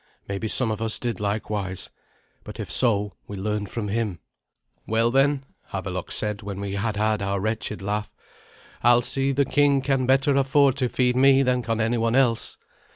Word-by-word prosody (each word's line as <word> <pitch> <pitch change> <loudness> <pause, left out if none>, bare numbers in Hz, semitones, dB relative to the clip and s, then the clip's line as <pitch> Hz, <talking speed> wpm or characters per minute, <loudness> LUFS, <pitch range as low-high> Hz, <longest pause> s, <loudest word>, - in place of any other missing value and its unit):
Maybe 100 +2 -3
some 115 +1 +3
of 110 0 -4
us 110 -1 +3
did 120 -5 -3
likewise; 100 -2 -2 0.5
but, - - -10
if - - -5
so, 105 -5 +2
we 100 - -7
learned 105 0 -2
from 110 0 -4
him. 105 -4 -1 0.7
"Well, 115 +2 +2
then," 135 +1 +2 0.3
Havelok 95 -1 -4
said, 105 -1 -3
when 100 -2 -6
we 100 -1 -4
had 105 +2 -2
had 105 0 0
our 100 0 -1
wretched 110 -1 -3
laugh, 105 +1 -2 0.7
"Alsi, 120 +3 +3
the 140 +1 +1
king, 145 0 +3
can 135 -1 0
better 135 +1 +3
afford 135 0 +3
to 130 -3 0
feed 125 +1 +1
me 135 +1 +5
than 125 -1 +1
can 115 -1 -2
anyone 115 +1 +1
else. 125 -4 +1
115 Hz, 170 wpm, -24 LUFS, 105-130 Hz, 0.7 s, me